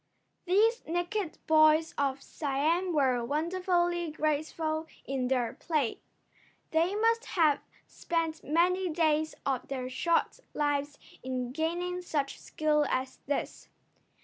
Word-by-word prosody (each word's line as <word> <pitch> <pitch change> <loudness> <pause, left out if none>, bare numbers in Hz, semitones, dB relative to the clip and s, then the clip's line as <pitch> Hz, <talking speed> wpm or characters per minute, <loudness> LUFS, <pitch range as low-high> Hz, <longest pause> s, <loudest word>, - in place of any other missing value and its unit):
These 435 +6 +3
naked 350 +2 -2
boys 310 0 +5
of 275 -1 -1
Siam 315 +6 0
were 260 -6 +2
wonderfully 345 +4 0
graceful 310 +1 -1 0.2
in 260 -2 -1
their 250 -3 0
play. 300 -9 -1 0.7
They 335 +5 +2
must 460 +2 +2
have 310 -5 +3 0.3
spent 330 -1 -2
many 360 +4 +2
days 315 -1 +1
of 265 -3 -1
their 255 -2 -4
short 335 +6 +1 0.2
lives 290 -1 0 0.2
in 255 -1 -3
gaining 345 +4 -2
such 290 -6 -2
skill 300 -1 +1
as 260 0 -2
this. 285 - -3
310 Hz, 115 wpm, -30 LUFS, 280-345 Hz, 0.7 s, boys